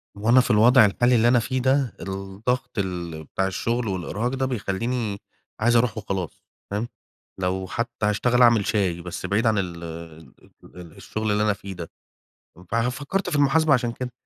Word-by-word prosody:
وأنا 115 +5 +4
في 125 - -1
الوضع 115 +2 +6
الحالي 120 +5 +2
اللي 115 +1 +4
أنا 120 0 +5
فيه 130 +3 -2
ده، 130 -2 +2
الضغط 95 +6 -3
ال 85 -4 -4
بتاع 95 +5 -2
الشغل 115 +4 -2
والإرهاق 95 +5 -2
ده 130 0 0
بيخليني 115 -1 -2 0.4
عايز 120 +2 +3
أروح 115 -2 +2
وخلاص. 95 -6 -5 0.3
فاهم؟ 105 +4 -2 0.5
لو 95 0 -1
حتى 115 +1 -3
هاشتغل 120 +4 +2
أعمل 115 -4 +5
شاي، 90 -5 0
بس 90 +1 -6
بعيد 100 +5 0
عن 110 -1 +2
ال 85 -3 -3
ال 85 +1 -12
الشغل 110 -1 -3
اللي 105 +1 +2
أنا 105 -1 +2
فيه 100 -1 -8
ده. 85 -2 -8 0.8
فأنا 115 +1 +1
فكرت 145 +9 -3
في 165 - -2
المحاسبة 145 +2 +4
عشان 125 -3 +1
كده. 125 +1 -6
110 Hz, 170 wpm, -24 LUFS, 95-125 Hz, 0.8 s, الوضع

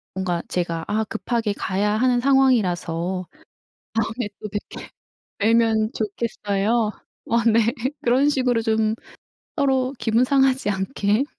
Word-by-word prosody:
뭔가 180 -3 -1
"제가 170 -2 -2
아 215 +1 0
급하게 220 +1 -2
가야 200 +1 -1
하는 250 0 +3
상황이라서 185 -10 +1 0.7
다음에 225 +1 -1
또 210 - -5
뵙게 205 +1 -6 0.5
뵈면 220 0 +2
좋겠어요." 215 0 -1 0.3
어 230 0 +1
네. 230 0 +4 0.4
그런 265 +2 +3
식으로 250 -5 +1
좀 220 -1 +1 0.6
서로 265 -2 +1
기분 225 +1 +2
상하지 265 -4 +2
않게 205 +4 0
220 Hz, 240 characters per minute, -22 LUFS, 200-245 Hz, 0.7 s, 네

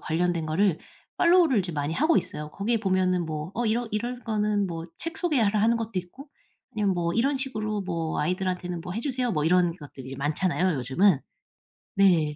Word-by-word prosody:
관련된 165 0 0
거를 170 +2 +2 0.4
팔로우를 340 -7 +5
이제 185 -2 -1
많이 145 -1 -2
하고 310 - +3
있어요. 150 0 -3
거기에 215 +6 -1
보면은 185 -3 +1
뭐 155 +1 -4
어 240 +1 -1
이런 230 +2 0
이런 240 +4 -3
거는 210 -2 0
뭐 165 -2 -5
책 330 -1 -5
소개라 225 - +2
하는 230 +2 +3
것도 225 -1 -4
있고 220 - -6 0.4
아니면 205 -3 +1
"뭐 170 -1 -1
이런 275 +5 +2
식으로 215 -6 -2
뭐 165 -4 -3
아이들한테는 180 +1 -2
뭐 180 +2 -6
해주세요." 250 0 -1
뭐 150 -3 0
이런 175 0 +3
것들이 135 -3 -9
많잖아요 165 +4 0
요즘은. 140 - +3 0.8
네. 170 -7 +4
185 Hz, 380 characters per minute, -26 LUFS, 165-225 Hz, 0.8 s, 팔로우를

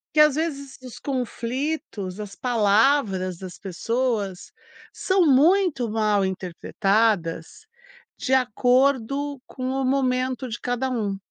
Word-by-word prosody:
Que 305 - +7
às 300 -2 +5
vezes 280 -4 -3
os 255 -2 -10
conflitos, 250 - -4
as 200 -1 -8
palavras 210 -5 +2
das 185 -1 -9
pessoas 210 0 -2 0.4
são 375 -2 +2
muito 295 - +3
mal 210 -2 +2
interpretadas, 190 -1 0 0.7
de 265 - -1
acordo 260 +2 +1
com 255 -1 -7
o 270 0 -1
momento 255 -1 0
de 235 0 -5
cada 245 +1 -1
um. 210 -6 -2
250 Hz, 110 wpm, -24 LUFS, 205-275 Hz, 0.7 s, Que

